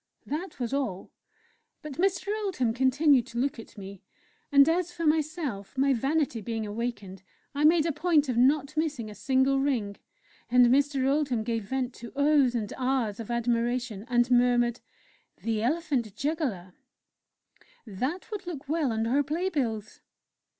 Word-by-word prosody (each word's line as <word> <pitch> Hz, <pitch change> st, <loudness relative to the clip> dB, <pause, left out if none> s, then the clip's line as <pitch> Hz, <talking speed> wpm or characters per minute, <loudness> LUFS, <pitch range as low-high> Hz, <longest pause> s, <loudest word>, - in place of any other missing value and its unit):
That 315 Hz, +2 st, -5 dB
was 245 Hz, 0 st, -3 dB
all. 250 Hz, -10 st, -3 dB, 0.7 s
But 300 Hz, -1 st, -8 dB
Mr. 385 Hz, +1 st, +1 dB
Oldham 260 Hz, -, 0 dB
continued 265 Hz, +1 st, +3 dB
to 235 Hz, -, -8 dB
look 260 Hz, 0 st, -1 dB
at 225 Hz, -, -12 dB
me; 195 Hz, -1 st, -9 dB, 0.5 s
and 280 Hz, 0 st, +7 dB
as 350 Hz, +1 st, +1 dB
for 335 Hz, -1 st, -4 dB
myself, 300 Hz, -, -1 dB
my 275 Hz, +1 st, +3 dB
vanity 270 Hz, -1 st, 0 dB
being 225 Hz, +1 st, -3 dB
awakened, 210 Hz, -3 st, -5 dB, 0.3 s
I 290 Hz, +1 st, +1 dB
made 320 Hz, 0 st, +5 dB
a 330 Hz, -, +1 dB
point 305 Hz, -1 st, +2 dB
of 250 Hz, -, -1 dB
not 280 Hz, +4 st, +2 dB
missing 290 Hz, -9 st, -2 dB
a -, -, -8 dB
single 265 Hz, +3 st, +2 dB
ring, 240 Hz, -8 st, -1 dB, 0.5 s
and 250 Hz, 0 st, +6 dB
Mr. 270 Hz, +1 st, +2 dB
Oldham 275 Hz, -5 st, +1 dB
gave 225 Hz, -2 st, -2 dB
vent 255 Hz, +2 st, -2 dB
to 235 Hz, -, -9 dB
"Ohs!" 285 Hz, -3 st, +3 dB
and 215 Hz, -3 st, -3 dB
"Ahs!" 250 Hz, -5 st, 0 dB
of 230 Hz, -, -7 dB
admiration, 235 Hz, -2 st, -1 dB
and 240 Hz, 0 st, +2 dB
murmured: 245 Hz, -1 st, +3 dB, 0.6 s
"'The 225 Hz, -2 st, -1 dB
Elephant 255 Hz, -, -1 dB
Juggler' 250 Hz, -, -3 dB, 1.1 s
That 260 Hz, -, -4 dB
would 400 Hz, -4 st, -6 dB
look 300 Hz, -5 st, -6 dB
well 305 Hz, -3 st, 0 dB
on 225 Hz, 0 st, -1 dB
our 265 Hz, +5 st, +2 dB
play 320 Hz, +7 st, -1 dB
bills!" 225 Hz, -, -3 dB
260 Hz, 155 wpm, -28 LUFS, 230-300 Hz, 1.1 s, and